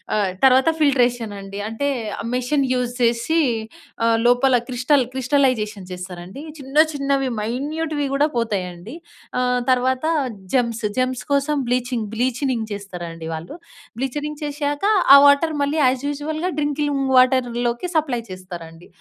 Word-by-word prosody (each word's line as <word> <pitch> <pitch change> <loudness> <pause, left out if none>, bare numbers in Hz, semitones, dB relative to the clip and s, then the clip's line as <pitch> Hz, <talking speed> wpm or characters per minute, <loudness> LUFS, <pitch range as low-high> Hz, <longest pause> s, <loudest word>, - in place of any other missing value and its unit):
ఆహ్, 200 -3 +1
తర్వాత 265 +3 +6
ఫిల్ట్రేషన్ 245 -7 +2
అండి. 195 +1 -8
అంటే, 225 +6 -2 0.3
ఆ - - -3
మెషిన్ 270 +3 +1
యూజ్ 250 -1 -1
చేసీ, 235 +7 +2 0.7
ఆహ్, 230 0 +3
లోపల 245 +2 +4
క్రిస్టల్ 255 +2 +2
క్రిస్టలైజేషన్ 250 -7 0
చేస్తారండి. 180 - -8 0.2
చిన్న 270 +2 -6 0.2
చిన్నవి 275 -1 0
మైన్యూట్‌వి 290 +6 -2
గూడా 285 +2 +3
పోతాయండి. 195 - -3 0.4
ఆహ్, 250 0 +1
తర్వాత 255 +2 +1 0.5
జమ్స్ 235 -3 0 0.2
జమ్స్ 255 -3 -1
కోసం 280 +2 +1 0.2
బ్లీచింగ్, 245 -3 -1
బ్లీచినింగ్ 250 0 -1
చేస్తారండి 175 -5 -7
వాళ్ళు. 165 - -7 0.4
బ్లీచనింగ్ 295 +3 -3
చేషాక 290 +3 -2 0.3
ఆ - - +11
వాటర్ 285 +3 +4
మళ్ళీ 290 +3 0
యాజ్ 255 +1 +1
యూజువల్‌గా 310 +4 -3
డ్రింకిలింగు 290 -2 0
వాటర్‍లోకి 245 +1 +1
సప్లై 270 -7 +1
చేస్తారండి. 175 -3 -10
255 Hz, 125 wpm, -21 LUFS, 225-285 Hz, 0.7 s, ఆ